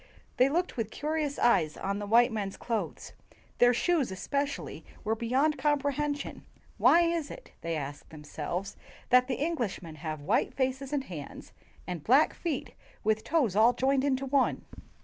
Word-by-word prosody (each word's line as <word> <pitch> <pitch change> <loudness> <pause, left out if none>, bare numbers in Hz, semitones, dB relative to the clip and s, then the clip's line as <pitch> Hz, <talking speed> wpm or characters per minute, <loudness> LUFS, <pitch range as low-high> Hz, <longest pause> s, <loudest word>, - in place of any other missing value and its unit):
They 255 +2 +5
looked 350 +2 -1
with 225 -3 -1
curious 300 +1 -2
eyes 155 -10 +3
on 200 +1 -2
the 205 - -5
white 235 +3 +5
men's 200 -3 -3
clothes; 230 -2 -4 0.5
their 245 0 +7
shoes, 300 +3 +1
especially, 280 +9 -3 0.2
were 215 - 0
beyond 260 +6 +1
comprehen 290 0 +1
sion. 285 - -8 0.4
"Why 345 - +6
is 335 -3 0
it," - - -11
they 165 0 -2
asked 145 -1 -6
themselves, 160 +5 -5 0.4
"that 250 0 +6
the 255 - -2
Englishmen 200 - -3
have 155 -1 -5
white - - +1
faces 265 +1 -1
and 285 -2 0
hands 160 - -9 0.3
and 175 -4 -5
black 270 +6 +4
feet 320 -7 -4 0.3
with 220 0 +1
toes 250 - +1
all 225 +3 +6
joined 265 +1 +1
into 275 -1 0
one?" 270 -1 +1
250 Hz, 160 wpm, -29 LUFS, 200-285 Hz, 0.5 s, their